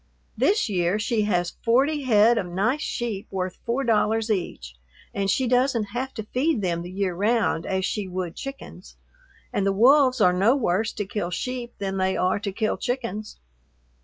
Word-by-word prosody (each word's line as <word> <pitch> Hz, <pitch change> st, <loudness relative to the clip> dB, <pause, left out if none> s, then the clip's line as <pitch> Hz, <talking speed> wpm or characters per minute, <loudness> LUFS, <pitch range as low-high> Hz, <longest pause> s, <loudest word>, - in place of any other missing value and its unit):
This 420 Hz, +2 st, +2 dB
year 180 Hz, -1 st, +1 dB
she 220 Hz, -1 st, 0 dB
has 175 Hz, -4 st, -1 dB
forty 275 Hz, +6 st, +2 dB
head 225 Hz, 0 st, +5 dB
of 180 Hz, -, -3 dB
nice 215 Hz, +11 st, 0 dB
sheep 230 Hz, -9 st, -3 dB
worth 185 Hz, -1 st, -4 dB
four 245 Hz, +4 st, 0 dB
dollars 225 Hz, -1 st, +1 dB
each, 65 Hz, -, -3 dB, 0.4 s
and 195 Hz, -1 st, -1 dB
she 255 Hz, +6 st, +1 dB
doesn't 245 Hz, -3 st, +1 dB
have 260 Hz, +2 st, -3 dB
to 220 Hz, -, -4 dB
feed 255 Hz, +2 st, 0 dB
them 170 Hz, -2 st, -1 dB
the 175 Hz, -, -7 dB
year 190 Hz, 0 st, -2 dB
round 205 Hz, -3 st, +1 dB
as 190 Hz, -1 st, 0 dB
she 205 Hz, -2 st, -2 dB
would 180 Hz, -2 st, -4 dB
chickens, 275 Hz, 0 st, -9 dB, 0.6 s
and 200 Hz, -, 0 dB
the 195 Hz, -, +2 dB
wolves 255 Hz, +5 st, +5 dB
are 180 Hz, -4 st, +5 dB
no 200 Hz, +8 st, +3 dB
worse 220 Hz, -4 st, 0 dB
to 205 Hz, -, -3 dB
kill 190 Hz, -2 st, -3 dB
sheep 245 Hz, +4 st, -4 dB
than 195 Hz, -1 st, -3 dB
they 190 Hz, 0 st, 0 dB
are 185 Hz, +2 st, +1 dB
to 200 Hz, -1 st, -3 dB
kill 215 Hz, +2 st, -1 dB
chickens. 230 Hz, -4 st, -4 dB
210 Hz, 180 wpm, -24 LUFS, 190-245 Hz, 0.6 s, head